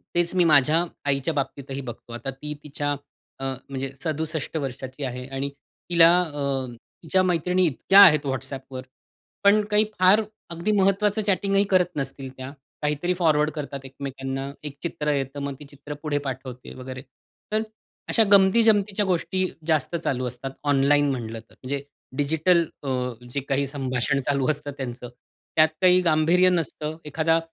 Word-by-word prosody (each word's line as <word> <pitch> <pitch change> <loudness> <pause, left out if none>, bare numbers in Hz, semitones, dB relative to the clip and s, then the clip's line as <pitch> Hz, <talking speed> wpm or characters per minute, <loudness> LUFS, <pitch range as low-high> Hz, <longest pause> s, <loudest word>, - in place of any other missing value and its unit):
तेच 175 +1 +1
मी 180 - +5
माझ्या 150 +4 +4 0.2
आईच्या 140 +3 +1
बाबतीतही 140 -1 -3
बघतो. 120 - -13
आता 120 +3 -5
ती 150 +3 -6
तिच्या 145 0 -3 0.5
अ, - - -6 0.3
म्हणजे 135 0 -4
67 160 -1 -2
वर्षाची 135 0 -5
आहे 125 -1 -4
आणि 135 +1 -3 0.4
तिला 170 -1 +7
अ, 140 -5 -2 0.4
तिच्या 185 +3 +2
मैत्रिणी 180 +1 +2
इतक्या 190 +7 +4
आहेत 155 -6 +7
व्हॉट्सॲपवर, 130 0 -4 0.6
पण 205 +1 +5
काही 210 +1 +5
फार 190 +4 +6 0.3
अगदी 170 +6 -1
महत्त्वाचं 200 +2 +2
चॅटिंगही 195 0 +2
करत 180 -2 +2
नसतील 135 -1 -4
त्या. 130 +1 -7 0.3
काहीतरी 150 +4 0
फॉरवर्ड 155 -4 +2
करतात 140 -2 -5
एकमेकांना 135 0 -5 0.2
एक 140 -1 -9
चित्र 150 -3 -1
येतं, 135 0 -3
मग 140 -1 -3
ती 150 - -10
चित्र 145 +1 -9
पुढे 150 -2 0
पाठवते 130 -1 -7
वगैरे. 130 0 -7 0.5
तर 215 +1 +2 0.5
अशा 225 - +4
गमती-जमतीच्या 205 0 +4
गोष्टी 185 +1 0 0.2
जास्त 160 +1 +1
चालू 130 -6 -1
असतात 125 +2 -6 0.2
ऑनलाईन 145 +1 +4
म्हटलं 115 -3 -4
तर. 110 - -19
म्हणजे 140 +2 -3 0.3
डिजिटल 160 +4 +3 0.2
अ, 140 - -3 0.4
जे 140 - 0
काही 140 +1 +1
संभाषण 135 0 -1
चालू 140 0 +1
असतं 145 -1 -5
त्यांचं. 125 -2 -6 0.5
त्यात 155 0 +6
काही 185 0 +6
गांभीर्य 165 +4 +4
नसतं. 160 -2 -2
एखादा 160 +2 +2
150 Hz, 150 wpm, -24 LUFS, 135-175 Hz, 0.6 s, तिला